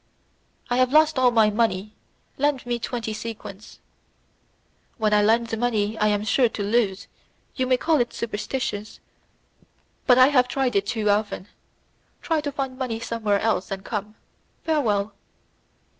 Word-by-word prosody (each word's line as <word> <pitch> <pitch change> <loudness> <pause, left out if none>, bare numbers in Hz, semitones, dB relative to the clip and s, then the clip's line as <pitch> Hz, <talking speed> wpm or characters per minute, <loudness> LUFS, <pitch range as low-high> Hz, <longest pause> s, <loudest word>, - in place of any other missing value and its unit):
"I 245 - 0
have 255 0 +3
lost 310 -1 +4
all 255 -1 +5
my 220 -3 +4
money. 210 -2 0 0.5
Lend 290 -2 +1
me 240 -1 -2
twenty 230 -2 -4
sequins." 215 -2 -8 1.2
"When 215 -3 +1
I 210 - +5
lend 225 +2 +2
money 220 -3 0
I 210 - +3
am 205 0 +1
sure 235 +3 +3
to 210 - -4
lose; 200 -2 0 0.5
you 260 -1 -1
may 255 0 +3
call 310 0 +2
it 240 - -1
superstition, 215 -1 -3 1.2
but 250 -2 +6
I 255 +1 +7
have 250 -4 +3
tried 260 -2 -1
it 200 0 +1
too 220 -3 +1
often. 205 -1 -2 0.7
Try 320 -2 0
to 290 -1 -3
find 270 -2 -4
money 240 -4 -2
somewhere 215 -3 -1
else, 220 -4 0
and 195 -1 -5
come. 210 -1 -4 0.5
Farewell." 220 -10 0
230 Hz, 150 wpm, -24 LUFS, 210-255 Hz, 1.2 s, I